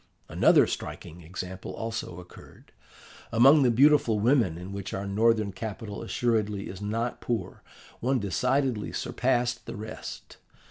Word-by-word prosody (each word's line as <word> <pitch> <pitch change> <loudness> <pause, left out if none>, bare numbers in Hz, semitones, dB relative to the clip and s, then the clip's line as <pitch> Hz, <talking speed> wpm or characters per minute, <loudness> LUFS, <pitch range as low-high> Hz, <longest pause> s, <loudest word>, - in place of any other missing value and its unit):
"Another - - +5
striking 85 +3 -6
example 90 +3 -7
also 110 -6 -5
occurred. 90 - -15 0.6
Among 135 +6 +6
the 130 - +4
beautiful 125 -3 +4
women 115 - +2
in 90 +3 -8
which 100 -1 -5
our 95 - -4
northern 110 +1 +2
capital 105 +1 -6
assuredly 110 -4 -1
is 95 - -8
not 115 +4 -2
poor, 120 -2 -3 0.4
one 130 +3 +1
decidedly 125 +3 0
surpassed 120 -2 -1
the 115 - -5
rest. 110 0 -8
110 Hz, 130 wpm, -27 LUFS, 100-120 Hz, 0.6 s, Among